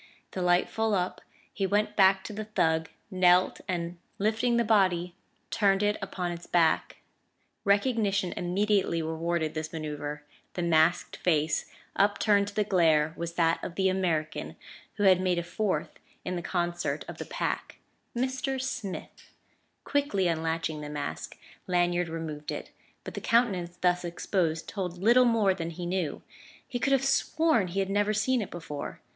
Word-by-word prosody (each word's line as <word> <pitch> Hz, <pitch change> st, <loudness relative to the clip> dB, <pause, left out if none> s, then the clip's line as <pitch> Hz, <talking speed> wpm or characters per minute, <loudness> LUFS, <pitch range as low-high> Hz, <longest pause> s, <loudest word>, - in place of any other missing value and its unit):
The 185 Hz, -, -4 dB
light 175 Hz, 0 st, +3 dB
full 220 Hz, -1 st, 0 dB
up, 180 Hz, -1 st, -2 dB, 0.3 s
he 195 Hz, -2 st, -1 dB
went 205 Hz, +2 st, +1 dB
back 190 Hz, -1 st, +5 dB
to 215 Hz, -, -7 dB
the 215 Hz, +1 st, -5 dB
thug, 160 Hz, -6 st, +1 dB, 0.2 s
knelt 185 Hz, -1 st, +4 dB
and, 175 Hz, -1 st, -3 dB, 0.2 s
lifting 225 Hz, +4 st, +1 dB
the 235 Hz, -, +3 dB
body, 185 Hz, -5 st, +2 dB, 0.4 s
turned 200 Hz, -2 st, +3 dB
it 205 Hz, 0 st, +2 dB
upon 180 Hz, -2 st, -3 dB
its 170 Hz, 0 st, -8 dB
back. 165 Hz, -2 st, +2 dB, 0.7 s
Recognition 200 Hz, -3 st, +2 dB
immediately 185 Hz, -2 st, +1 dB
rewarded 160 Hz, 0 st, -1 dB
this 155 Hz, 0 st, -4 dB
manoeuvre: 150 Hz, -2 st, -5 dB, 0.3 s
the 175 Hz, -, -1 dB
masked 165 Hz, +1 st, +2 dB
face 155 Hz, -3 st, +1 dB, 0.3 s
upturned 200 Hz, 0 st, +3 dB
to 200 Hz, -, -8 dB
the 210 Hz, -, +2 dB
glare 160 Hz, -6 st, +3 dB
was 170 Hz, 0 st, -4 dB
that 165 Hz, -1 st, +1 dB
of 170 Hz, -, -5 dB
the 190 Hz, -1 st, +2 dB
American 170 Hz, -5 st, -1 dB, 0.4 s
who 205 Hz, -, -1 dB
had 185 Hz, -2 st, +6 dB
made 180 Hz, -1 st, +1 dB
a 170 Hz, -, 0 dB
fourth 200 Hz, +3 st, -2 dB, 0.3 s
in 180 Hz, -, -2 dB
the 175 Hz, -, -3 dB
concert 175 Hz, 0 st, -2 dB
of -, -, -8 dB
the -, -, -4 dB
Pack -, -, -3 dB, 0.4 s
"Mr. 260 Hz, +1 st, -1 dB
Smith," 250 Hz, -7 st, -6 dB, 0.5 s
Quickly 280 Hz, -11 st, +1 dB
unlatching 160 Hz, -1 st, -1 dB
the 150 Hz, -, -6 dB
mask, 145 Hz, -1 st, -5 dB, 0.3 s
Lanyard 175 Hz, -1 st, +1 dB
removed 160 Hz, -2 st, -5 dB
it; -, -, -6 dB, 0.3 s
but -, -, -7 dB
the -, -, -5 dB
countenance 190 Hz, -7 st, +1 dB
thus 180 Hz, 0 st, +1 dB
exposed 170 Hz, -1 st, -1 dB
told 180 Hz, -4 st, -4 dB
little 235 Hz, +7 st, +5 dB
more 220 Hz, -5 st, +3 dB
than 165 Hz, -3 st, -4 dB
he 175 Hz, +1 st, -6 dB
knew; 175 Hz, -4 st, -2 dB, 0.4 s
he 245 Hz, -, -3 dB
could 275 Hz, -, +1 dB
have 270 Hz, -1 st, +3 dB
sworn 275 Hz, -, +2 dB
he 185 Hz, +3 st, -3 dB
had 195 Hz, -, -2 dB
never 205 Hz, +1 st, +1 dB
seen 250 Hz, +4 st, +2 dB
it 200 Hz, -, -5 dB
before. 150 Hz, -4 st, -6 dB
180 Hz, 160 wpm, -28 LUFS, 170-205 Hz, 0.7 s, had